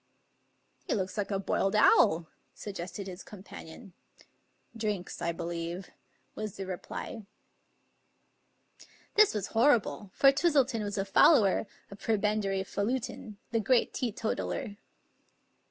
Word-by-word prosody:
" - - -42
He - - +1
looks 190 -3 -2
like 205 -2 -2
a 200 - 0
boiled 195 +1 0
owl," 165 -5 +5 0.3
suggested 195 -1 -6
his 185 -1 -8
companion. 195 0 -11 0.4
" - - -39
Drinks, 210 -5 -3
I 170 - 0
believe," 170 +2 -5 0.4
was 215 -2 -5
the 195 - -4
reply. 190 +3 -6 1.9
This 425 - +5
was 205 -3 -2
horrible, 225 -4 +2
for 275 - +6
Twistleton 275 -6 +2
was 205 0 -4
a 195 - 0
follower 200 - +5 0.2
of 200 - -10
Pre 225 -1 +1
bendary 200 -2 0
Falutin, 220 0 -3
the 230 - +1
great 240 +3 +2
teetotaller. 225 -1 -3
205 Hz, 120 wpm, -30 LUFS, 190-225 Hz, 1.9 s, for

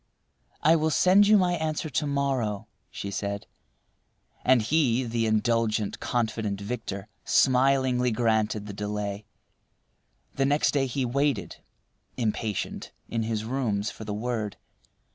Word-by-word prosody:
"I 160 +2 +6
will 160 -1 +1
send 190 +5 +5
you 210 0 +7
my 180 -2 +2
answer 155 0 -2
to 150 0 -1
morrow," 130 -7 -1 0.2
she 100 - -6
said; 100 +1 -3 1.0
and 125 -3 +4
he, 130 -1 +2
the 115 -1 -1
indulgent, 110 -1 +1
confident 110 -4 -1
victor, 100 -2 -5 0.2
smilingly 130 -1 +3
granted 110 -2 +1
the 105 - -7
delay. 105 0 -4 1.1
The 135 - +1
next 145 +2 +2
day 135 -2 +1
he 130 +1 -1
waited, 130 - -1 0.6
impatient, 110 -3 -2 0.2
in 115 - -1
his 110 -1 -2
rooms 115 -4 -1
for - - -10
the 105 - -5
word. 110 -1 -3
115 Hz, 125 wpm, -27 LUFS, 105-135 Hz, 1.1 s, you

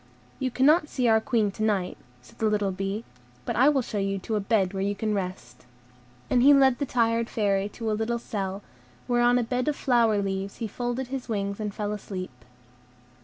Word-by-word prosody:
"You 260 -1 0
cannot 300 +5 +3
see 250 -3 0
our 220 -1 +4
Queen 225 -5 +1
to 215 - -9
night," 205 -4 0 0.3
said - - -19
the 220 - +2
little 205 -2 0
bee, 195 +3 -3 0.4
"but - - -2
I 265 +4 +5
will 275 -4 +2
show 210 - -3
you 195 0 -1
to 215 +3 -3
a - - +1
bed 200 -2 +1
where 190 - -2
you 200 +1 0
can 215 +1 -1
rest." 185 -11 -5 0.6
And 245 - +3
he 285 +3 +7
led 265 -2 +4
the 285 - -1
tired 230 -1 +1
Fairy 200 -2 0
to 220 +1 -4
a - - +1
little 225 +2 -1
cell, 200 -3 -4 0.4
where 240 -1 +1
on 245 +1 +4
a 245 - +1
bed 250 +4 -2
of 300 - +1
flower 230 -6 +2
leaves 195 0 -3
he 230 - -3
folded 245 +3 -3
his 260 -2 -5
wings 200 -2 -2
and 210 -1 -3
fell 205 +1 -3
asleep. 190 -3 -5
220 Hz, 215 wpm, -26 LUFS, 200-245 Hz, 0.6 s, he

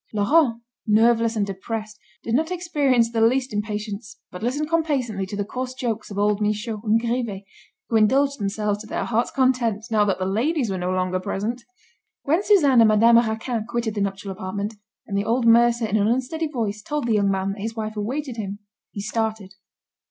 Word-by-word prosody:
Laurent, 230 +2 +2 0.2
nerveless 230 +1 +3
and 210 -2 +1
depressed, 215 +2 -5 0.2
did 230 - -3
not 315 +6 +2
experience 290 -10 +1
the 225 -1 0
least 250 +2 +2
impatience, 210 +1 -4
but 180 - -8
listened 275 +7 -1
complacently 270 - -1
to 205 - -6
the 205 - -1
coarse 255 +3 -5
jokes 235 -4 -3
of 200 - -7
old 205 0 +1
Michaud 210 +1 -1
and 220 0 +3
Grivet, 230 -4 -2 0.4
who 225 - +2
indulged 275 +6 +3
themselves 205 0 -1
to 215 - -10
their - - -2
hearts' 235 +1 0
content, 245 -5 +1
now 215 -1 +4
that 195 -3 0
the 185 - -2
ladies 235 - 0
were 190 - -2
no 180 +1 -2
longer 185 0 0
present. 215 +6 -3 0.6
When 320 +6 +2
Suzanne 295 - +5
and 225 - +7
Madame 225 +2 +6
Raquin 225 0 -1
quitted 235 -2 -1
the 205 - -2
nuptial 195 0 -3
apartment, 195 +3 -4 0.3
and 200 - -5
the 200 - +1
old 230 +3 0
mercer 235 0 +5
in 215 0 0
an 205 0 +2
unsteady 260 +7 -1
voice 220 -7 -3
told 295 +3 -3
the 235 - +1
young 200 -2 +2
man 195 0 0
that 200 0 -7
his 225 +2 -4
wife 215 -1 -4
awaited 250 +4 -3
him, 200 -2 -4 0.3
he 200 - -6
started. 215 -2 -3
225 Hz, 195 wpm, -23 LUFS, 205-245 Hz, 0.6 s, and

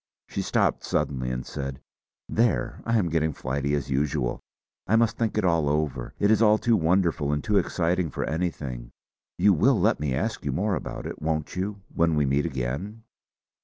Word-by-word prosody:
She - - -2
stopped - - +1
suddenly 65 -3 -1
and 60 0 -3
said: 70 -1 -5 0.5
"There! 110 - 0
I 115 0 +2
am 90 -6 +1
getting 80 -1 +1
flighty 70 +2 -1
as 70 -1 -3
usual. 65 -2 0 0.5
I 115 - +3
must 115 0 +3
think 115 -2 -1
it 105 - +2
all 85 -4 +2
over. 70 -4 -2
It 100 - +3
is 110 - +4
all 105 -1 +6
too 115 +1 +2
wonderful 85 -4 +2
and 75 0 -1
too 105 -1 +3
exciting 90 0 0
for - - -3
anything. 70 -7 -3 0.5
You 100 +3 +5
will 110 - +3
let - - +2
me 70 -3 -1
ask - - -2
you - - -1
more 100 +2 0
about - - -4
it, - - -6
won't 80 0 -2
you, 100 +2 -3
when 85 -1 +2
we 75 -1 +2
meet 70 +2 +1
again?" 70 - -4
80 Hz, 190 wpm, -26 LUFS, 70-100 Hz, 0.5 s, all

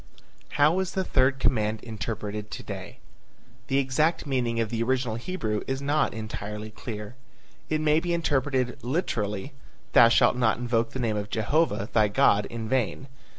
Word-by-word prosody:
How 150 +5 +4
is 190 -1 -2
the 190 - 0
third 135 -4 +2
command 110 -4 0
interpreted 105 -2 -5
to - - -7
day? - - -7 0.7
The 135 -1 +1
exact 140 +6 +1
meaning 125 -4 0
of 115 -1 -1
the 115 -1 -1
original 125 -1 0
Hebrew 115 - -3
is 135 0 -1
not 145 -2 +1
entirely 110 -1 -6
clear. 105 -1 -7 0.6
It 155 0 0
may 155 0 +3
be 175 +1 -3
interpreted 135 -6 0
literally: 120 - -2 0.4
"Thou 115 - +8
shall - - +5
not 120 -3 +2
invoke 120 -1 0
the 130 - -6
name 110 -4 0
of 105 0 -4
Jehovah, 110 0 +1
thy 110 -2 +4
God, 100 0 +3
in 115 -1 -5
vain." 130 +2 -1
120 Hz, 160 wpm, -26 LUFS, 110-140 Hz, 0.7 s, Thou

